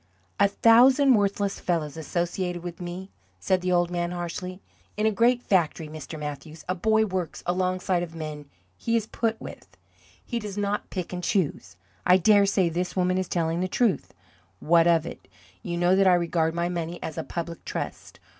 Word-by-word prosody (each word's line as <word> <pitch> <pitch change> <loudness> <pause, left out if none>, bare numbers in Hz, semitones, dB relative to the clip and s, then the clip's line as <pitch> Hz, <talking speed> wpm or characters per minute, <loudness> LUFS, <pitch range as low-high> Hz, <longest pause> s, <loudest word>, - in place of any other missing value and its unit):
"A 200 - +6
thousand 255 +6 +5
worthless 200 -2 0
fellows 160 -5 -1
associated 175 +2 -3
with 175 0 -7
me," 180 +2 -6 0.3
said 185 -1 +1
the 180 0 -1
old 175 -1 +2
man, 175 -1 -1
harshly. 180 +1 -5 0.4
"In 210 - +1
a 220 - +4
great 240 +4 +2
factory, 165 -4 +1
Mr. 155 0 -8
Mathews, 150 +1 -7
a 185 - 0
boy 220 +4 +2
works 185 -4 -4
alongside 185 0 0
of 170 -2 -5
the - - -10
men 150 -2 -7 0.3
he 230 - -1
is 225 -2 +1
put 225 0 -2
with; - - -11 0.5
he 235 - -3
does 210 -2 -7
not 205 0 -2
pick 180 -2 -5
and 180 0 -4
choose. 150 - -1 0.3
I 180 - +6
dare 200 +1 +5
say 195 -2 +2
this 175 +2 -2
woman 185 0 +1
is 185 - -2
telling 165 -1 -1
the 185 - 0
truth. 215 +1 0 0.5
What 170 +1 +4
of 165 -2 +3
it? - - -9 0.3
You 170 -1 -4
know 175 +2 +3
that 195 0 +4
I 180 - +6
regard 165 -1 0
my 170 0 0
money 170 -1 -3
as 160 - -5
a 160 - -3
public 170 0 -6
trust. - - -6
180 Hz, 190 wpm, -26 LUFS, 170-200 Hz, 0.5 s, A